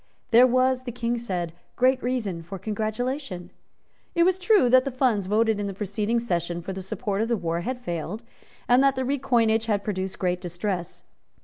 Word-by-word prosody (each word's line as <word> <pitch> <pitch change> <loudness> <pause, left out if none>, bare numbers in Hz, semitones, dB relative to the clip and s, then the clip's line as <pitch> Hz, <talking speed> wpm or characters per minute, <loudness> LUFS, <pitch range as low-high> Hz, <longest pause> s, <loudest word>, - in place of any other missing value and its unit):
There 245 +2 +8
was, 255 +1 +2
the 245 - -3
King 235 0 -2
said, 180 -7 -3 0.2
great 255 0 +3
reason 225 -9 -2
for 180 +4 -7
congratulation. 215 - -3 0.6
It 340 - +5
was 370 +1 +2
true 380 - +4
that 255 +1 +6
the 275 - -2
funds 245 -7 +1
voted 220 +1 +2
in 205 - -2
the 195 - -5
preceding 210 +3 -1
session 175 -6 -2
for 190 - -4
the 190 - -5
support 200 +2 -2
of 225 - 0
the 235 -1 +1
war 170 -2 -2
had 250 +7 -3
failed, 185 0 -4 0.4
and 245 +2 +5
that 275 0 +4
the 260 - -1
recoinage 240 -5 +2
had 205 -2 0
produced 190 -2 -3
great 180 -1 -1
distress. 175 0 -4
220 Hz, 190 wpm, -25 LUFS, 185-250 Hz, 0.6 s, There